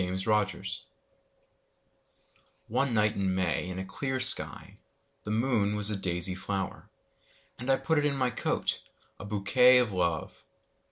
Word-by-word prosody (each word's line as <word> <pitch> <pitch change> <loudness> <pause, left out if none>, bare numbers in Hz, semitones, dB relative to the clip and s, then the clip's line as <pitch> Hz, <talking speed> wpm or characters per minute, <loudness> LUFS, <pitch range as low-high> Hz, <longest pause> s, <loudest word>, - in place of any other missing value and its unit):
My 90 +1 -4
Flower 105 +2 +1 2.2
ONE 130 +4 -1
night 105 -2 +1
in 95 -1 -2
May 90 -1 -2
in 90 - -7
a 95 - -5
clear 130 +8 -4
skyThe 105 - +4 0.6
moon 110 -2 0
was 105 0 +7
a - - -1
daisy 90 -1 -2
flower:And! 100 +6 -6
put 160 -2 +1
it 145 - -1
in 145 -1 0
my 130 -2 0
coat,A 100 - -3
bouquet 110 +5 +3
of 125 -4 +1
Love! 85 -4 -3
105 Hz, 125 wpm, -28 LUFS, 95-125 Hz, 2.2 s, was